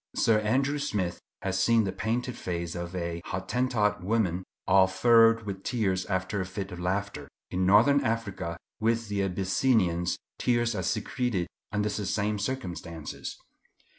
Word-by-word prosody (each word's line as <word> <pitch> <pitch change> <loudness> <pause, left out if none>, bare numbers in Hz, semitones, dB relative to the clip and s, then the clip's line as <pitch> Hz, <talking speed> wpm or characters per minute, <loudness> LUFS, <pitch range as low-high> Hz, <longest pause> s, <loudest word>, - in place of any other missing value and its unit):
Sir 110 -2 +4
Andrew 135 +7 +1
Smith 100 -11 -2 0.2
has 95 0 0
seen 115 +3 +4
the 95 - -1
painted 115 +5 -2
face 85 -1 -4
of 85 +1 -5
a 85 -1 -3
Hottentot 105 0 0
woman 95 -3 +1 0.2
all 95 0 +6
furrowed 115 +4 +5
with 100 -2 -5
tears 95 -7 0
after 95 +1 -1
a - - -2
fit 95 +1 -5
of 90 - -7
laughter. 100 +3 -2 0.2
In 90 0 +1
Northern 120 +9 +6
Africa, 100 -7 -2 0.2
with 115 0 +1
the 100 -1 0
Abyssinians, 95 -1 +1 0.2
tears 120 -1 +2
are 100 - -2
secreted 110 0 -1 0.3
under 105 0 0
the 100 -1 -3
same 105 0 0
circumstances. 90 - -5
100 Hz, 145 wpm, -28 LUFS, 95-115 Hz, 0.3 s, all